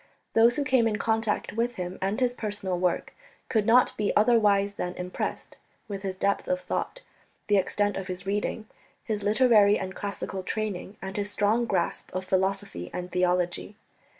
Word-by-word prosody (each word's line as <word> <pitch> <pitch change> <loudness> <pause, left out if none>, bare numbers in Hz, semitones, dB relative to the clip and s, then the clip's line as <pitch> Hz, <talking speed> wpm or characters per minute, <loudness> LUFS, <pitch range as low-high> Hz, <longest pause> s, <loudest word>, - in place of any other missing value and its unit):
Those 230 +2 +5
who 295 - 0
came 255 -4 +3
in 215 -2 0
contact 225 -1 0
with 235 +2 -1
him 180 0 -5
and 195 +4 0
his 250 -1 +2
personal 205 -6 -3
work 180 -1 0 0.4
could 215 -4 +1
not 245 +2 +5
be 210 -1 +1
otherwise 210 -3 +4
than 180 -2 -4
impressed 180 0 -5 0.3
with 200 -2 -5
his 190 -1 -4
depth 200 +1 0
of 275 0 +1
thought, - - -3 0.4
the 205 - +3
extent 205 +1 +1
of 190 -1 -5
his 185 0 -5
reading, 205 +2 -2 0.4
his 215 -2 -2
literary 210 -1 +5
and 185 -1 -5
classical 200 -1 -4
training, 205 0 -4
and 190 +1 -5
his 205 0 -1
strong 215 +3 +2
grasp 185 -6 -1
of 185 0 -2
philosophy 190 - -1
and 180 0 -5
theology. 180 +2 0
205 Hz, 170 wpm, -27 LUFS, 185-220 Hz, 0.4 s, Those